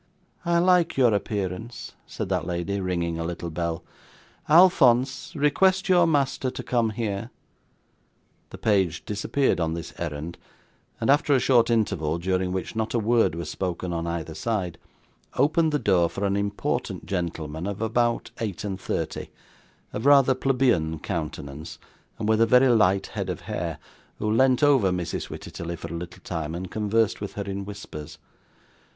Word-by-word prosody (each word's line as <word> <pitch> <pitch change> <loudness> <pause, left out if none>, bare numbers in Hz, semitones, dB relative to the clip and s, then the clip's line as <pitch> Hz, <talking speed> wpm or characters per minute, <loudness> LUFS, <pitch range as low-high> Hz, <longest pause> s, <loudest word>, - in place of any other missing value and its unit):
'I 170 0 +2
like 175 -2 +3
your 125 -4 +5
appearance,' 100 +2 -3 0.2
said - - -4
that 90 -4 -1
lady, 90 +3 -2
ringing 85 -3 -2
a - - -2
little 85 0 -4
bell. 85 +1 -3 0.7
'Alphonse, 135 -7 +5
request 185 +7 +2
your 175 -2 +5
master 140 -4 +1
to - - -6
come 120 -3 +1
here.' 110 0 -3 1.2
The - - -9
page 95 -6 +1
disappeared 105 +4 0
on 80 -1 0
this 85 -1 -7
errand, 80 0 -5 0.6
and 115 - +3
after 145 0 +4
a - - +4
short 120 -2 +4
interval, 100 -9 +1
during 90 +1 -1
which 95 +4 -4
not 110 +1 -1
a - - +4
word 115 -6 +2
was 85 - -5
spoken 90 -1 -3
on 85 0 -2
either 85 -1 -4
side, 95 -3 -2 0.6
opened 155 +4 +3
the 150 - +2
door 90 - +2
for 100 - -3
an 100 0 +1
important 100 0 -2
gentleman 85 -2 -3
of 100 0 -4
about 115 +1 0
eight 105 -5 -3
and 95 -2 -4
thirty, - - -3 0.6
of 110 +6 -1
rather 140 -2 +6
plebeian 125 -12 +1
countenance, 75 -3 -5 0.4
and 105 - -3
with 110 0 +3
a 115 - +5
very 125 +3 +6
light 100 -5 +3
head - - -3
of - - -4
hair, - - -4 0.4
who 105 - -1
leant 130 +4 +3
over 135 -10 +5
Mrs 90 -2 -3
Wititterly 85 0 -6
for 85 0 -7
a - - -3
little 85 +2 -8
time, 80 -2 -4
and 90 +1 -6
conversed 110 0 +1
with 100 - -5
her 100 - -4
in 100 0 -5
whispers. 85 -6 -8
100 Hz, 160 wpm, -25 LUFS, 85-125 Hz, 1.2 s, rather